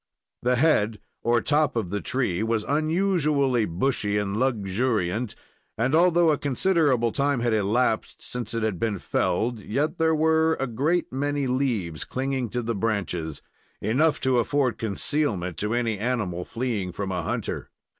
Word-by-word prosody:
The 125 +1 +2
head 115 -7 +2 0.2
or 120 0 +2
top 150 0 +2
of 105 -6 -2
the 105 0 -2
tree 120 -9 -1
was 110 -1 0
unusually 150 - +1
bushy 105 +2 0
and 100 -1 -1
luxuriant, 110 -2 0 0.4
and, 125 +5 +1
although 170 0 +5
a 150 - 0
considerable 140 -5 +2
time 140 -1 0
had 120 -1 +1
elapsed 110 +2 +1
since 120 -2 -4
it 115 - -1
had 105 -6 -1
been 110 -3 0
felled, 115 +6 0
yet 145 - -2
there 160 0 +3
were 160 +1 +3
a 135 - -2
great 140 +7 0
many 145 +1 -1
leaves 120 - -1
clinging 130 -2 -2
to 120 +2 -2
the 115 +1 -1
branches 95 -8 -2 0.4
not 105 - -3
enough 155 +6 +3
to 130 -2 +3
afford 125 -1 +1
concealment 100 - -1
to 105 +3 -1
any 115 -4 0
animal 105 -7 -2
fleeing 115 -7 -2
from 95 +2 -4
a 90 -1 -1
hunter. 80 - -3
120 Hz, 155 wpm, -25 LUFS, 105-145 Hz, 0.4 s, although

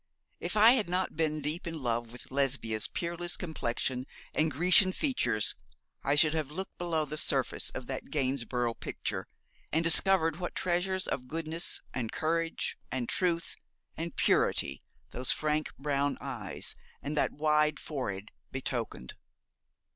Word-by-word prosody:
If 175 +5 -2
I 220 +3 +9
had 225 -8 +2
not 180 -1 0
been 155 -1 0
deep 155 +4 -1
in 165 -1 -3
love 120 -4 -1
with 125 +2 -12
Lesbia's 130 -5 +1
peerless 175 0 -2
complexion 130 -5 -2 0.3
and 160 +1 +3
Grecian 180 +5 +4
features, 120 - +1 0.5
I 140 - +2
should 155 0 +5
have 155 -3 -1
looked 190 +6 -6
below 165 -3 0
the 150 +1 -3
surface 135 -4 +1
of 130 - -6
that 130 +1 -5
Gainsborough 130 -4 0
picture, - - -4 0.4
and 160 +2 +2
discovered 165 -1 +6
what 175 -1 -4
treasures 185 +1 +1
of 125 -1 -3
goodness, 165 +3 -1
and 115 -4 -2
courage, 165 +1 -1
and 125 -2 -1
truth 170 -3 0 0.4
and 165 0 -4
purity - - +2 0.3
those 125 +1 +1
frank 155 0 0
brown 140 0 0
eyes 120 -8 -4 0.3
and 145 +2 -2
that - - +1
wide 150 0 +2
forehead 105 -9 -4 0.2
betokened. 120 - -4
150 Hz, 140 wpm, -31 LUFS, 130-170 Hz, 0.5 s, I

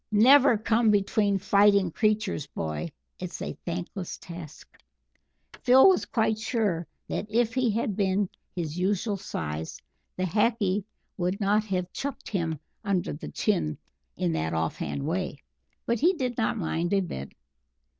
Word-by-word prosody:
"Never 245 +3 +7
come 225 +1 +2
between 205 0 +2
fighting 200 -1 +4
creatures, 210 -6 0
boy 80 - -4 0.3
it's 180 -1 -6
a - - -4
thankless 180 +2 -4
task." 170 -4 -11 0.8
Phil 260 +5 +7
was 380 - +4
quite 220 -1 +1
sure 210 - -1 0.2
that 210 - -3
if 230 +1 +1
he 255 -2 +2
had 215 -1 -1
been 195 0 +1 0.3
his 165 -1 -3
usual 200 +3 0
size 80 - -5 0.4
the 185 - -1
Hackee 205 0 +1 0.3
would 180 +1 -1
not 210 +1 +2
have 180 -3 -2
chucked 280 -1 -5
him 165 -6 -1 0.2
under 190 - 0
the - - -7
chin 75 -1 0 0.4
in 90 - 0
that 80 0 -1
off 80 0 -1
hand 140 - -3
way, 180 0 -2 0.5
but 235 -1 0
he 345 +6 +4
did 255 -7 -2
not 225 0 0
mind 170 -1 -1
a 195 - +4
bit. 70 - -6
200 Hz, 145 wpm, -27 LUFS, 170-220 Hz, 0.8 s, Never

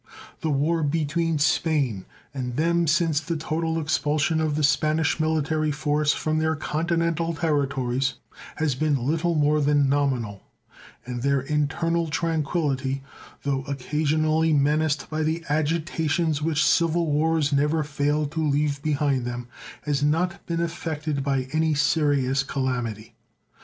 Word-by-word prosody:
The 160 - -2
war 155 +4 +1
between 160 +2 0
Spain 145 - +1 0.3
and 125 -3 -4
them 170 +3 +2
since 160 -1 +2
the 165 +1 -3
total 160 +1 -1
expulsion 155 +1 +1
of 155 -2 0
the 155 - 0
Spanish 155 +2 +2
military 155 0 0
force 150 +1 +1
from 155 0 -1
their 160 0 +1
continental 165 +2 -1
territories 135 -5 0 0.4
has 155 -3 0
been 140 -2 0
little 165 +4 +1
more 150 0 +3
than 145 -1 +3
nominal, 130 -8 0 0.6
and 120 -1 -5
their 140 +1 +2
internal 160 +4 0
tranquillity, 145 -4 -1 0.4
though 140 -1 0
occasionally 155 +3 +1
menaced 150 0 +1
by 155 0 -3
the 160 +2 -1
agitations 155 0 0
which 155 -1 +1
civil 170 0 +2
wars 155 0 +1
never 150 +3 +2
fail 145 +1 0
to 160 +2 -3
leave 145 -1 0
behind 145 -3 0
them, 120 0 -5 0.3
has 145 -2 -1
not 170 +6 0
been 170 -1 -1
affected 160 -4 -3
by 135 -2 0
any 160 -1 +2
serious 145 -3 +2
calamity. 125 -5 -3
150 Hz, 130 wpm, -25 LUFS, 140-160 Hz, 0.6 s, more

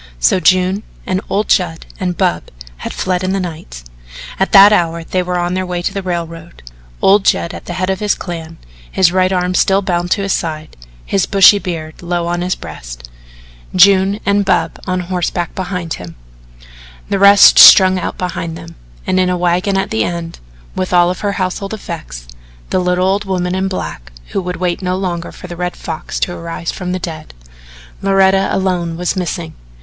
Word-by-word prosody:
So - - +3
June 185 +2 +2 0.2
and 185 +1 -1
old 205 +2 0
Judd 170 -4 0
and 180 -3 -2
Bub 85 - 0 0.3
had - - -6
fled 185 -1 -2
in 185 +1 -1
the 195 - 0
night. 160 - -7 0.6
At 190 - 0
that 200 +1 +8
hour 170 -3 0
they 185 +2 -1
were 180 0 -2
on 175 0 -1
their 185 0 -1
way 180 -1 -4
to - - -2
the 195 - -3
railroad 170 - -6 0.4
old 200 +1 +5
Judd 170 - +1
at - - -9
the 175 - -5
head 185 +1 -1
of 190 - -3
his 210 -1 +1
clan 165 -2 -7 0.3
his 180 -3 +3
right 185 0 +2
arm 180 -1 0
still 195 +2 +2
bound 175 -1 -1
to 200 +2 0
his 195 - 0
side, 155 -2 -4 0.3
his 195 - 0
bushy 200 +1 +6
beard 160 -4 -6
low 175 -1 -2
on 175 0 -2
his 180 +1 -1
breast, - - -10 0.6
June 195 +2 +5
and 200 0 +2
Bub 165 -5 0
on 185 0 -1
horseback 175 -1 -3
behind 180 -3 -4
him, 90 -2 -9 0.9
the 200 - 0
rest 200 0 +7
strung 185 -1 +8
out - - -4
behind 170 -2 -4
them, 165 -1 -11 0.3
and 185 - +1
in 185 -1 +2
a 180 - 0
wagon 180 +3 0
at 195 - -2
the 110 0 +1
end, 170 +2 -5 0.4
with 185 0 -3
all 175 0 +4
her 200 +2 -3
household 195 +2 -3
effects, - - -8 0.4
the - - +2
little 180 0 +1
old 200 +2 0
woman 180 -2 -2
in 190 +1 -1
black - - -6 0.2
who 195 - -2
would 180 0 -4
wait 180 +1 -2
no 180 0 -1
longer 175 -3 -4
for - - -12
the 175 -1 -7
Red 180 0 -3
Fox 160 -2 -6
to 175 - 0
arise 165 0 -5
from 180 -1 -5
the 185 - -1
dead. 160 - -8 0.7
Loretta 195 0 +3
alone 180 -3 -1
was 180 +2 -1
missing. 170 -3 -4
180 Hz, 190 wpm, -15 LUFS, 170-190 Hz, 0.9 s, that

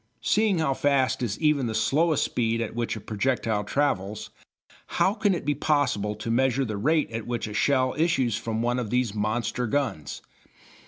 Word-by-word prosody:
Seeing 215 -3 +2
how 155 -4 +1
fast 130 -2 +1
is 110 -4 -2
even 150 -5 +2
the 110 - -3
slowest 140 +8 +2
speed 115 -1 0
at 115 - -3
which 115 0 -2
a - - -6
projectile 110 0 -1
travels, 105 -5 -1 0.7
how 195 - +3
can 205 -3 +1
it 170 - -5
be 150 - +2
possible 140 -8 0
to 110 +2 -4
measure 130 +2 +2
the 110 -3 -4
rate 150 +9 +1
at 115 0 -5
which 120 -1 -2
a 105 - -6
shell 130 +2 +2
issues 135 -8 +1
from 110 0 -3
one 120 +1 0
of 115 -4 -3
these 125 -2 0
monster 110 +3 -1
guns. 135 - -2
125 Hz, 180 wpm, -26 LUFS, 110-145 Hz, 0.7 s, how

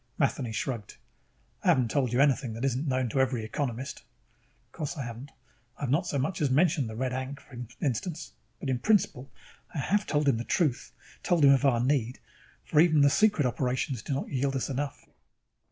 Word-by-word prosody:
Matheny 120 -3 0
shrugged. 115 -1 -4 0.7
"I - - -3
haven't 125 -4 +3
told 130 -5 +1
you 120 - +1
anything 135 -4 +2
that 115 +4 -3
isn't 135 +3 -1
known 130 -1 +1
to 135 - -1
every 125 -4 0
economist." 125 +2 -4 0.7
_Of - - -42
course 155 +2 -5
I 140 - -3
haven't. 120 +4 -7 0.5
I've 140 -4 -2
not 165 +6 +1
so 140 - -1
much 155 +6 -1
as 145 - +2
mentioned 145 -3 +2
the 110 - -7
Red 130 +2 -2
Ankh, 130 +2 -4
for 130 - -15 0.2
instance. 155 +5 -3 0.3
But, 135 - -2
in 125 - 0
principle, 165 - +1 0.5
I - - -3
have 200 +9 0
told 145 -1 +1
him 135 -5 +4
the 115 - -3
truth, 150 -3 0 0.3
told 170 -5 +3
him 140 - +8
of 135 +1 +2
our 125 -4 +4
need; 130 -2 0 0.5
for 150 - +2
even 155 -2 +5
the 140 0 +5
secret 210 -8 +3
operations 125 +1 -1
do 140 - -4
not 140 - -3
yield 135 0 -1
us 135 +1 -2
enough. 140 +1 -4
135 Hz, 200 wpm, -28 LUFS, 125-145 Hz, 0.7 s, him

